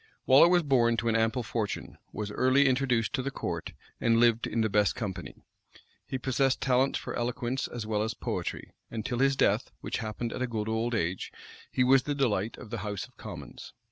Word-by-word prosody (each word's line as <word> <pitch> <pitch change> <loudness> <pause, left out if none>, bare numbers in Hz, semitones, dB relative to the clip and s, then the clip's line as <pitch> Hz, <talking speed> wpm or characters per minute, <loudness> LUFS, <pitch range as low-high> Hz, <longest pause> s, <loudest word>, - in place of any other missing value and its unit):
Waller 135 +6 +8
was 175 0 +4
born 120 -5 +3
to 115 0 0
an 115 - +1
ample 115 +2 +1
fortune, 110 -2 -3 0.2
was 105 0 -4
early 130 +5 +4
introduced 125 -3 +1
to 135 - 0
the 135 - -2
court, 135 - -4 0.3
and 115 -1 +3
lived 115 -1 +3
in 115 - 0
the 110 - +2
best 105 -1 +2
company. 95 -6 -6 0.6
He 130 - -2
possessed 135 +1 +1
talents 135 0 +2
for - - -6
eloquence 125 +2 -2
as 120 -3 -6
well 105 -1 0
as 110 +1 -2
poetry; - - -4 0.2
and 110 -2 -5
till 120 - -2
his 135 0 +3
death, - - +2
which - - -3
happened 115 +1 -4
in - - -5
a 130 - +1
good 110 -3 -3
old 115 +2 0
age, 90 -2 -2 0.4
he 125 - +2
was 130 +1 +5
the 145 +2 -3
delight 115 -6 0
of 115 -4 -11
the 115 - -3
house 105 -1 -4
of - - -28
commons. - - -9
120 Hz, 205 wpm, -29 LUFS, 110-130 Hz, 0.6 s, Waller